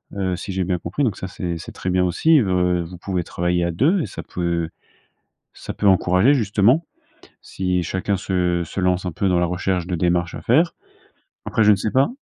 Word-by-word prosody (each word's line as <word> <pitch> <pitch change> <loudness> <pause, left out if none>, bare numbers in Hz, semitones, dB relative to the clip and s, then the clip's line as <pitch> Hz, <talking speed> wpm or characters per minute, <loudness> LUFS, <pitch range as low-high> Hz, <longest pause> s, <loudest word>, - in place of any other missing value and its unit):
Heu, 95 -2 -1
si 95 - -6
j'ai 95 0 0
bien 90 0 -1
compris, 90 +12 -3
donc 110 -7 0
ça 95 - -5
c'est 90 -2 -4
c'est 80 - -9
très 95 - -4
bien 90 0 +2
aussi 155 - +4
v 100 - -1
heu, 90 -1 +1
vous 90 +2 -9
pouvez 90 -1 -3
travailler 85 0 -1
à 85 - -1
2 145 - +2
et - - -2
ça - - -8
peut 85 -2 -2 0.8
ça - - -7
peut - - -3
encourager 95 +6 +4
justement, 115 - +2 0.6
si 90 -1 -2
chacun 95 +4 -1
se 90 -2 0
se 95 - -5
lance 90 0 +1
un 90 - -3
peu 100 - 0
dans 90 -1 +2
la 90 - +2
recherche 90 0 -1
de 90 - -3
démarches 85 0 0
à - - -6
faire. 160 +9 +3 0.7
Après 110 - +1
je 105 - +6
ne - - +3
sais 100 +3 -2
pas? 135 +4 +3
90 Hz, 220 wpm, -21 LUFS, 90-100 Hz, 0.8 s, je